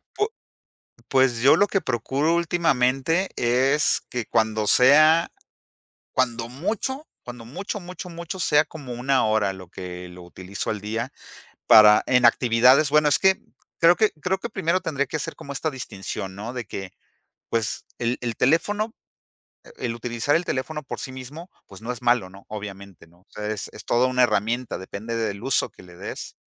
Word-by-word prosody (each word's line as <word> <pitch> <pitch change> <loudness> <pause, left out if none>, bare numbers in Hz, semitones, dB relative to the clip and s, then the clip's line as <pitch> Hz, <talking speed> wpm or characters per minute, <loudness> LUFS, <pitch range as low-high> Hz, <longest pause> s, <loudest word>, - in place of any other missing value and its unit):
Pu 415 - +1 0.8
pues, 130 -3 +2
yo 135 - +7
lo 205 - +4
que 195 - 0
procuro 135 - 0
últimamente 165 0 +1
es 130 +5 +2
que 125 -2 -3
cuando 110 -1 0
sea 155 +8 +6 0.8
cuando 120 -2 -1
mucho, 225 - -3 0.2
cuando 120 -2 -9
mucho, 195 - -5
mucho, 180 0 -8
mucho 170 +2 -7
sea 150 -3 +3
como 140 -6 -9
1 130 +2 +1
hora 110 -3 +1
lo 95 -2 -12
que 90 -1 -8
lo 90 0 -12
utilizó 95 +4 -5
al 105 -2 -4
día 115 +5 -3 0.6
para 105 -1 +8
en 125 -1 +4
actividades. 125 +5 +5
Bueno, 150 +1 +4
es - - +3
que 190 0 +3 0.4
creo 170 +1 +6
que 215 -1 +3
creo 185 +3 0
que 235 - -5
primero 170 -3 0
tendría 140 -4 -1
que 155 +4 -3
ser - - -4
como 140 - -9
esta 150 +3 -1
distinción, 100 -7 -6
¿no? 110 +5 -6
De 125 -2 -5
que, 95 -2 -7 0.6
pues, 115 -2 -2
el 120 +1 -1
el 120 -2 -3
teléfono 205 - +1 0.8
el 120 -2 -3
utilizar 120 +4 -1
el 170 - +1
teléfono 150 +3 -3
por 135 - -6
sí 130 - -5
mismo, 140 +7 -9 0.2
pues, 95 0 -13
no 115 +2 -4
es 125 0 -7
malo, 120 -6 +2
¿no? 95 +1 -15
Obviamente, 100 -4 -9
¿no? 85 +2 -25
O - - -33
sea, 105 0 -6
es 105 -1 -3
es - - -11
toda 120 +2 +2
una 125 0 +2
herramienta. 115 +2 0
Depende 100 +5 -6
del 105 -3 -2
uso 135 0 +1
que - - -16
le 90 -1 -15
des, - - -7
125 Hz, 175 wpm, -24 LUFS, 110-155 Hz, 0.8 s, para